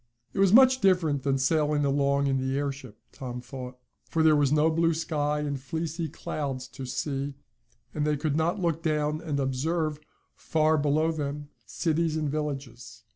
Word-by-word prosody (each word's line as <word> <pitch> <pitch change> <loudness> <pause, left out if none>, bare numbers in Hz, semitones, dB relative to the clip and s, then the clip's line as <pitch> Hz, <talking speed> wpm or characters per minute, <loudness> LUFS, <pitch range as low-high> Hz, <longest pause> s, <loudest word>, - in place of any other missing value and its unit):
It - - -4
was 195 -1 +5
much 260 +2 +6
different 170 -7 +3
from 135 0 +1
sailing 150 +1 +2
along 140 0 +2
in 135 -1 +1
the 130 +1 -1
airship, 135 -6 -4
Tom 125 -2 -6
thought, 125 0 -8 0.3
for 160 - +1
there 155 -1 +6
was 145 -2 +2
no 155 +2 +4
blue 165 0 +2
sky 150 -2 -1
and 140 -2 -3
fleecy 160 +3 -3
clouds 135 -3 -4
to 135 -2 -8
see, 135 +2 -3 0.6
and 150 - -1
they 150 -1 +1
could 150 0 -1
not 165 +5 +1
look 165 -3 0
down 150 -1 0
and 150 -4 -2
observe, 150 +4 -1 0.4
far 155 0 +1
below 150 +3 +2
them, 145 -1 -4 0.2
cities 160 -1 0
and 150 -2 -1
villages. 125 -6 -5
150 Hz, 170 wpm, -27 LUFS, 135-160 Hz, 0.6 s, much